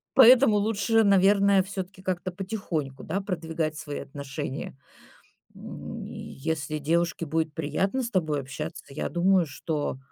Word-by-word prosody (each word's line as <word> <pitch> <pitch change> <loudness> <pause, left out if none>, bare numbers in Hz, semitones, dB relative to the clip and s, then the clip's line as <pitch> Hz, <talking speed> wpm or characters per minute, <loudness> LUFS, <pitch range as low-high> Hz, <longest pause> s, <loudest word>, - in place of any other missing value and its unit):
Поэтому 250 -3 +8
лучше, 220 +2 +2
наверное, 200 0 +5
всё-таки 190 -1 -6
как-то 185 0 -2
потихоньку, 180 -8 -4
да, 195 - -2
продвигать 160 -5 -3
свои 145 -1 -5
отношения. 135 -1 -6 0.8
М, - - -8
и - - -9
если 155 +1 -3
девушке 165 +3 0
будет 160 0 -1
приятно 195 - -1
с 235 - -3
тобой 155 - 0
общаться, 150 +5 -6
я 135 - -3
думаю, 180 +1 +3
что, 145 0 -3
170 Hz, 130 wpm, -27 LUFS, 150-195 Hz, 0.8 s, Поэтому